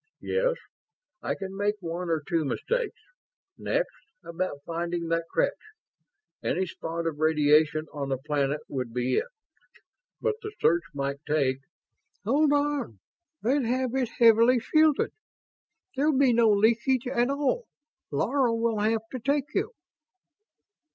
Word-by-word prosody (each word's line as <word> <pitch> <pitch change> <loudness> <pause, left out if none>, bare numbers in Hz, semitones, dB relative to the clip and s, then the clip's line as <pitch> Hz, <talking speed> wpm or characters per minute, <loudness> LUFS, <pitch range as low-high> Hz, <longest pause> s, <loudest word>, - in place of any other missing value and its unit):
"Yes. - - +1 0.7
I - - -2
can 195 -1 -7
make 205 +1 0
one 175 0 -4
or 160 -2 0
two 165 -2 +1
mistakes. 465 - -2 0.6
Next, - - -2 0.2
about 170 -4 -4
finding 170 0 -3
that 165 0 0
creche. - - +1 0.9
Any 190 - 0
spot 170 -1 -5
of 155 -3 -2
radiation 155 0 +3
on 140 -2 -4
the 135 - 0
planet 145 +1 -1
would 125 -4 -4
be 125 +1 +1
it, - - 0 0.9
but 470 -1 +1
the 425 0 -6
search 170 +1 +3
might 140 0 -2
take 140 -4 +1 0.4
..." - - -47
"Hold 285 +6 +3
on. 290 - 0 0.5
They'd 260 +3 +2
have 255 +1 0
it 260 -3 0
heavily 230 +1 +6
shielded 310 +4 +3 0.8
there'll 285 +1 +2
be 265 -3 +4
no 230 -1 +4
leakage 235 +5 +3
at 245 0 +1
all. 295 - 0 0.4
Laro 240 - +1
will 230 -1 0
have 220 +1 +1
to 255 - -4
take 280 +3 -1
you." - - 0
210 Hz, 135 wpm, -27 LUFS, -, 0.9 s, heavily